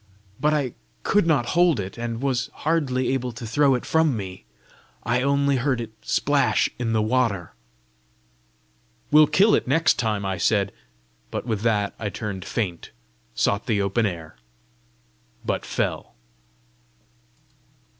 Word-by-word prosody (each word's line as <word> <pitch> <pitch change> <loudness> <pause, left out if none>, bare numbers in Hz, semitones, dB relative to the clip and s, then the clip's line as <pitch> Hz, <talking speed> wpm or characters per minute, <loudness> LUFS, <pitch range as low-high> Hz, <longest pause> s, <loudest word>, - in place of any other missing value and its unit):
But 150 - +2
I 140 -5 0 0.3
could 205 -4 +2
not 140 -7 +2
hold 175 -6 +4
it, 95 0 -5
and 115 +1 -4
was 130 -3 0 0.2
hardly 140 -6 +1
able 125 -2 -1
to 120 +1 -8
throw 135 +4 +3
it 125 - -4
from 160 -6 +2
me. 95 -8 -7 0.6
I 120 +2 +1
only 140 0 +2
heard 130 -1 0
it 115 -2 -5
splash - - +1
in 120 -2 -1
the 110 -1 +2
water!" 110 -7 0 1.6
"We'll 150 0 +7
kill 190 +9 +4
it - - +2
next 160 +5 +3
time!" 105 -3 -1
I 95 -2 -2
said; 100 +1 +2 0.6
but - - -4
with 110 -4 -2
that 105 -3 +1
I 105 - -2
turned 100 -3 -5
faint, 95 -8 -3 0.5
sought 100 - 0
the 110 -4 +1
open 100 +3 +1
air, 80 -7 -7 1.1
but - - -1
fell. - - -3
120 Hz, 140 wpm, -24 LUFS, 100-140 Hz, 1.6 s, We'll